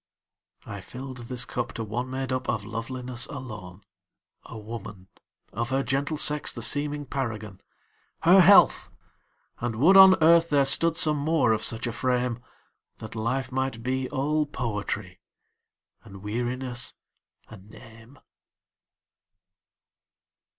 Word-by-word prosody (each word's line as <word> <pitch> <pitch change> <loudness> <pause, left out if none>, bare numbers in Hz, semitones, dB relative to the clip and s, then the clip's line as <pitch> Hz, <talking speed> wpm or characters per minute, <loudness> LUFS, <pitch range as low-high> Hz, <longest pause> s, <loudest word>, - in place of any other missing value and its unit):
I - - -8
filled 130 0 -9
this 125 0 -1
cup 120 - -4
to 115 - -5
one 120 +4 -4
made 130 0 -4
up 130 0 -3
of 105 -2 -2
loveliness 120 +2 -5
alone,A 95 -2 -12
woman, 105 -3 -9 0.4
of 120 0 -3
her 135 +1 0
gentle 135 +5 -2
sex 150 0 +2
the 120 - -6
seeming 145 +2 -1
paragon—Her 130 - -1
health! 195 +3 +5 0.7
and 120 -2 -3
would 160 - +4
on 190 -1 +9
earth 170 +1 +5
there 140 -2 +3
stood 165 +4 +3
some 150 -1 +3
more 145 -4 +1
of 110 - -2
such 115 0 -1
a 120 - -2
frame, 125 0 -1 0.6
That 110 - -9
life 120 +4 -3
might 130 -3 -3
be 130 +1 -2
all 150 +2 -1
poetry, 105 -7 -5 0.8
and 100 -3 -13
weariness 125 +3 -3 0.5
a 110 - -11
name. 110 +5 -16
125 Hz, 120 wpm, -26 LUFS, 110-135 Hz, 0.8 s, on